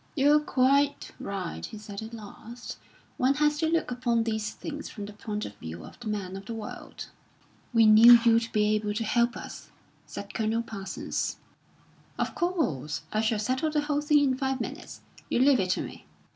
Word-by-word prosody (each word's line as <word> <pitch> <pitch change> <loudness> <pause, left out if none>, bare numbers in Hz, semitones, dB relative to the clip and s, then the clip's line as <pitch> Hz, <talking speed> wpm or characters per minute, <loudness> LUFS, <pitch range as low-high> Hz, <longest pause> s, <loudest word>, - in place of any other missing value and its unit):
"You're 295 +1 +5
quite 280 0 +2
right," 185 - -5
he 215 - -6
said 205 -1 -8
at 220 +1 -7
last; 230 +2 -9 0.4
"one 265 +2 +3
has 295 0 +2
to 320 - +2
look 330 -4 0
upon 240 -2 +1
these 220 -1 -2
things 300 -1 -7
from 205 -3 -7
the 205 - -9
point 210 0 -4
of 105 - -7
view 80 -1 -8
of - - -14
the 240 - -8
man 200 -3 -3
of 195 +1 -9
the 230 - -4
world." 220 -2 -8 0.6
"We 230 -2 +5
knew 225 +3 +9
you'd 230 0 +4
be 210 0 +2
able 210 -1 -1
to 225 - -1
help 235 +2 +1
us," - - -9 0.4
said - - -8
Colonel 225 +1 0
Parsons. 195 -4 -4 0.8
"Of - - -1
course! 265 - -1
I 215 - +2
shall 220 0 +1
settle 255 +8 0
the 300 -1 +1
whole 295 0 0
thing 295 -1 +4
in 260 -2 +1
five 265 -1 -1
minutes. 270 +7 -6 0.3
You - - +1
leave 265 +1 +5
it 185 -1 0
to - - +1
me." - - -10
230 Hz, 190 wpm, -28 LUFS, 210-275 Hz, 0.8 s, knew